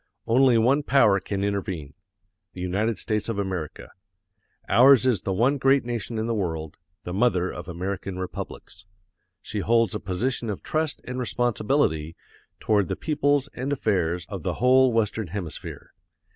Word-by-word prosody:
Only 125 +1 +4
one 130 +6 +3
power 115 -8 +4
can 100 +1 -3
intervene 95 -8 -3 0.6
the 90 - -8
United 100 +5 -1
States 110 0 -2
of 115 - -2
America. 95 -6 -4 0.8
Ours 130 0 +6
is 120 -8 +2
the 95 - -3
one 125 +9 +2
great 135 0 +3
nation 120 -1 -4
in 110 - -1
the 115 - -1
world, 80 -7 -3 0.3
the 90 - -5
mother 95 -4 +1
of - - -8
American 95 +2 -4
republics. 95 0 -7 0.6
She 105 - -4
holds 115 +4 +2
a 105 - -2
position 110 +5 -2
of 100 - -5
trust 155 -1 -2
and 125 +1 -5
responsibility 115 - 0 0.4
toward 105 -4 +1
the - - -2
peoples 145 -2 +1
and 130 +3 -4
affairs 90 - 0
of 100 -3 -6
the - - -2
whole 130 +1 +4
Western 110 -2 0
Hemisphere. 90 -2 -7
110 Hz, 155 wpm, -25 LUFS, 95-125 Hz, 0.8 s, Ours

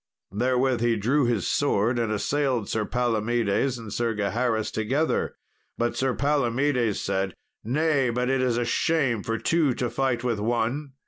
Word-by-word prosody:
Therewith 125 +3 +1
he 120 -1 +2
drew 125 +7 +2
his 115 -6 0
sword 120 -3 +1
and 115 -2 0
assailed 130 +1 0
Sir 110 -1 -1
Palomedes 120 +1 0
and 110 -3 -8
Sir 115 -2 -1
Gaheris 110 +2 0
together; 130 +9 0 0.4
but 120 0 0
Sir 130 -1 0
Palomedes 135 -4 +1
said, 95 -1 -2 0.3
"Nay, 140 +1 +1
but 125 +1 -1
it 135 0 +1
is 125 -2 +1
a 120 - 0
shame 135 -4 +1
for 115 +3 -2
two 155 -2 +1
to 120 -2 -2
fight 130 -3 0
with 120 -4 -1
one." 120 +6 -1
120 Hz, 155 wpm, -25 LUFS, 115-135 Hz, 0.4 s, he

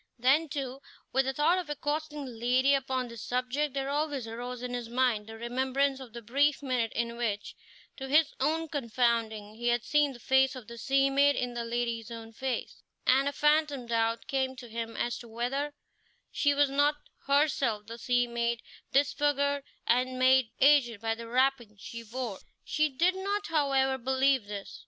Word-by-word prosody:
Then, 275 +6 +3
too, 270 -1 -4 0.3
with 265 +1 +3
the 265 - -1
thought 320 +6 +3
of 350 -4 -6
accosting 295 0 -3
the 255 - -7
lady 250 +4 +2
upon 260 -2 0
this 235 -1 -9
subject 255 +3 -1
there 275 0 -2
always 290 -4 -1
arose 245 +2 -6
in 250 0 -4
his 240 -2 -4
mind 240 -4 +1
the 225 0 -9
remembrance 265 +3 0
of 260 -3 -10
the 235 -1 -8
brief 280 +6 +2
minute 250 -4 0
in 235 0 -2
which, 215 -4 -2 0.4
to 265 -1 -6
his 300 +3 +4
own 320 +4 0
confounding, 230 -6 -1
he 240 +2 -4
had 240 -1 +2
seen 295 -1 +2
the 240 - -12
face 265 +2 +3
of 255 -3 -9
the 235 +1 -10
sea 275 +2 +2
maid 285 +1 +4
in 245 -1 -2
the 235 -1 -3
lady's 235 -1 -2
own 225 -1 -9
face, 260 +2 -4 0.2
and 270 +2 +4
a - - -5
phantom 295 -3 +2
doubt 230 0 0
came 265 -1 -1
to 250 -1 -10
him 230 0 -5
as 240 0 -1
to 240 - -11
whether 250 +6 -2 0.6
she 285 -1 +2
were 290 0 +5
not 285 +2 +2 0.3
herself 275 -7 +2
the 230 +2 -9
sea 245 +1 +2
maid, 235 -1 -2 0.3
disfigured 285 0 +2 0.2
and 255 +1 +1
made 260 -2 +4
aged 270 -6 +5
by 225 +1 -1
the 230 +1 -8
wrappings 245 -4 +1
she 230 +4 -7
wore. 230 -3 -5 0.2
He 305 0 +1
did 340 +7 +2
not, 400 +2 -2
however, 270 -4 +2
believe 265 -1 +2
this. 205 -1 -7
260 Hz, 185 wpm, -29 LUFS, 235-280 Hz, 0.6 s, were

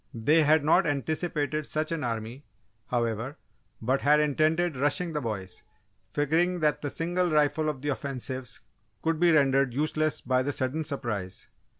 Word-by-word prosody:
They 150 +8 +4
had 155 0 +4
not 155 +2 +4
anticipated 150 +1 -1
such 155 +1 -2
an 165 -4 -2
army, 115 +3 -4 0.4
however, 120 +2 -2 0.5
but 130 +4 +1
had 150 +1 +4
intended 155 +3 +1
"rushing" 155 +6 0
the 150 - -1
boys, 95 -7 -5 0.5
figuring 165 +5 +1
that 150 -1 +1
the 145 - -2
single 175 +4 -1
rifle 155 0 +2
of 140 -3 -5
the 145 - -1
offensives 130 -2 -4 0.4
could 160 -1 0
be 175 0 +5
rendered 135 -4 +3
useless 155 +1 0
by 130 +1 +1
the 140 +3 -1
sudden 135 +4 -2
surprise. 105 -10 -5
145 Hz, 155 wpm, -27 LUFS, 130-155 Hz, 0.5 s, be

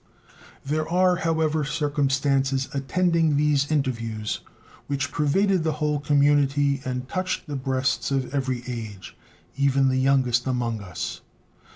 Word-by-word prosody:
There 155 +3 -1
are, 180 +1 +3
however, 160 -3 0
circumstances 135 -2 0
attending 165 +2 +1
these 145 -1 +2
interviews 115 -7 -1 0.5
which 140 0 -2
pervaded 185 +5 +2
the 160 -1 0
whole 150 -1 -1
community 145 -1 +2
and 125 -1 -4
touched 185 +3 -2
the 145 -3 -5
breasts 130 -1 -1
of 135 -1 -1
every 130 -3 -1
age, 110 -6 -7 0.4
even 135 -1 +3
the 130 0 +1
youngest 130 -2 +2
among 120 -4 -1
us. 90 -4 -5
140 Hz, 125 wpm, -24 LUFS, 130-150 Hz, 0.5 s, are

